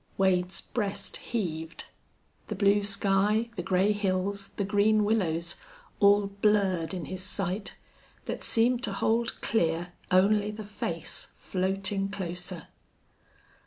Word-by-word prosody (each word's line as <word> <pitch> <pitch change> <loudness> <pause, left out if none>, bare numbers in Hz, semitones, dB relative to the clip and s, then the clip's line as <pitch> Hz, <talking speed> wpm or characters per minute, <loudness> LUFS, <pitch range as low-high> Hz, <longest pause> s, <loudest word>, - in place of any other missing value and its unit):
Wade's 185 -1 +2
breast 200 -3 -3
heaved. 165 -8 -4 0.6
The - - -3
blue 200 +1 +3
sky, 205 +3 +2
the 180 - -2
gray 190 +3 +2
hills, 200 -1 -1
the 200 - +1
green 210 +1 +3
willows, 170 -6 0 0.4
all 205 0 +6
blurred 200 -4 +1
in 180 -4 -4
his 185 +3 -6
sight, 195 +1 -3 0.5
that - - -4
seemed 240 +2 +2
to - - -3
hold 230 +1 0
clear 175 -4 0 0.2
only 205 +3 +4
the 210 0 -6
face 170 -6 -5
floating 195 +1 -1
closer. 180 -3 -5
195 Hz, 120 wpm, -28 LUFS, 185-210 Hz, 0.6 s, all